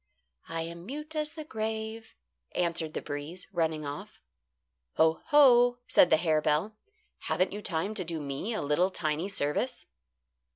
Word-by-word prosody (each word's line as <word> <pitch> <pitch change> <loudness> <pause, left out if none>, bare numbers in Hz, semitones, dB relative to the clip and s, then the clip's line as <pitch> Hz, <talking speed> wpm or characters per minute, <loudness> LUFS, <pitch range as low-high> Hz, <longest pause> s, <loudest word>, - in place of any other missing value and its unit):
"I 165 0 -2
am 170 +2 -8
mute 300 +4 -6
as 300 -1 -1
the 315 - -6
grave," 220 -2 -4 0.4
answered 165 -3 -1
the - - -3
breeze, 150 +5 -5
running 160 -3 0
off. 145 0 -7 0.8
"Ho! 160 0 +3
ho!" 245 -5 +6
said 175 - +6
the 160 - +6
harebell. 155 +4 +1 0.5
"Haven't 185 +2 +1
you 205 - -5
time 190 +2 -1
to 205 -4 -2
do 165 -1 -4
me 140 +9 -4
a - - -2
little, 150 +6 +2
tiny 160 0 -2
service?" 145 -7 -1
175 Hz, 150 wpm, -29 LUFS, 155-220 Hz, 0.8 s, ho